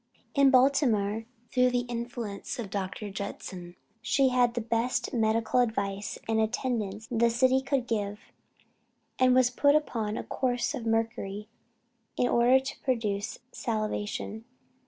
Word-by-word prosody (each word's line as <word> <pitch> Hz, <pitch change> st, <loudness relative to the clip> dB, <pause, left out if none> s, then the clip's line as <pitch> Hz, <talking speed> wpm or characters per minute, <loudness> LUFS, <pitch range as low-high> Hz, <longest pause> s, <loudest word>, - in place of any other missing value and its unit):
In 280 Hz, -1 st, +5 dB
Baltimore, 245 Hz, -6 st, +3 dB, 0.3 s
through 250 Hz, 0 st, +4 dB
the 245 Hz, 0 st, +1 dB
influence 235 Hz, -3 st, -5 dB
of 220 Hz, -6 st, -5 dB
Dr. 200 Hz, +1 st, -4 dB
Judson, 185 Hz, -3 st, -7 dB, 0.3 s
she 265 Hz, +3 st, +3 dB
had 245 Hz, -2 st, +2 dB
the -, -, 0 dB
best 230 Hz, +2 st, -1 dB
medical 225 Hz, +1 st, +2 dB
advice 200 Hz, -4 st, -1 dB
and 225 Hz, 0 st, +1 dB
attendance 220 Hz, -2 st, -1 dB
the 235 Hz, 0 st, +3 dB
city 255 Hz, +3 st, +3 dB
could 270 Hz, -2 st, 0 dB
give; 210 Hz, -3 st, -2 dB, 1.0 s
and 255 Hz, -1 st, +5 dB
was 255 Hz, -1 st, +4 dB
put 285 Hz, +3 st, +4 dB
upon 225 Hz, -8 st, -1 dB
a -, -, -3 dB
course 245 Hz, +1 st, -1 dB
of 245 Hz, -5 st, -4 dB
mercury 220 Hz, -2 st, -2 dB, 0.7 s
in 245 Hz, -, +2 dB
order 245 Hz, +2 st, +5 dB
to 270 Hz, +2 st, -7 dB
produce 215 Hz, -5 st, -1 dB
salivation. 215 Hz, 0 st, -3 dB
230 Hz, 135 wpm, -28 LUFS, 210-250 Hz, 1.0 s, In